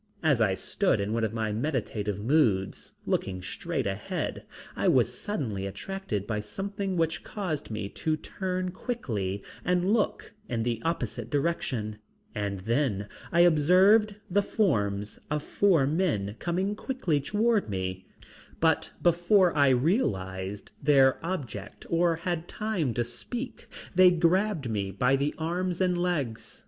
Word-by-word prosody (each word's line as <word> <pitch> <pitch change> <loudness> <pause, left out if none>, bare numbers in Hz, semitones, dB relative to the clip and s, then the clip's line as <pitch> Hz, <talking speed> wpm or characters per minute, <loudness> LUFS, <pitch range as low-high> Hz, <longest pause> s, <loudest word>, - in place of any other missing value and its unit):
As - - +3
I - - +3
stood - - 0
in 100 +2 -1
one 115 0 0
of 110 - 0
my 110 -1 -1
meditative 110 -5 -2
moods, 110 -6 +1
looking 95 -1 -1
straight - - -3
ahead, 100 +1 -3 0.3
I - - 0
was - - +3
suddenly 110 - -3
attracted 110 - -4
by 105 -1 -2
something 195 - -3
which 165 0 0
caused 180 -8 -4
me 110 -2 -3
to 155 +7 -1
turn 185 +1 -3
quickly 110 - -3 0.2
and 180 +3 +2
look 225 -3 0 0.2
in 115 -2 -1
the 115 -1 -1
opposite 125 -9 -2
direction, 130 -8 -1 0.3
and 100 -2 -3
then 110 -2 0 0.2
I 170 - +5
observed 185 +6 +5
the 200 +3 +2
forms 105 - 0
of 150 -1 -1
four 180 -9 +3
men 140 - 0
coming 185 +4 -1
quickly 210 - -1
toward 210 - +1
me, 95 -1 -3 0.5
but 160 -1 +2
before 175 +2 +4
I 140 -2 +5
realized 100 - 0
their 135 -1 +4
object 130 - -5
or 170 0 +3
had 170 0 -3
time 190 - -2
to 120 - +1
speak, 240 - -6 0.3
they 185 0 +7
grabbed 175 - +2
me 100 -3 -1
by 125 +8 +2
the 140 +2 -1
arms 175 +2 -2
and 180 -1 +2
legs. 155 -11 -2
150 Hz, 140 wpm, -28 LUFS, -, 0.5 s, they